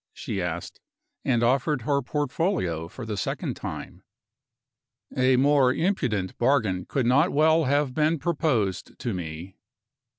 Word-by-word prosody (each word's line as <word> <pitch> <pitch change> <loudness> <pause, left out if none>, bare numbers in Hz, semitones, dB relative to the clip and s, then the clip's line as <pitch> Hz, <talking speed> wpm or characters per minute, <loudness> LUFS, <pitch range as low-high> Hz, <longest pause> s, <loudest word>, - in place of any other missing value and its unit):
she 95 - -4
asked, 85 -1 -4 0.4
and 120 -3 +1
offered 135 +2 +1
her 140 +2 +1
portfolio 130 - -1
for 120 +7 -9
the 110 -1 -3
second - - -3
time. - - -7 1.1
A 130 0 +4
more 135 0 +4
impudent 125 - -1
bargain 115 -8 +1
could 135 -3 -1
not 140 +9 +4
well 160 +2 +4
have 140 0 +1
been 155 +3 +2
proposed 140 - -1
to 120 - -3
me. 85 +1 -7
130 Hz, 130 wpm, -26 LUFS, 100-150 Hz, 1.1 s, A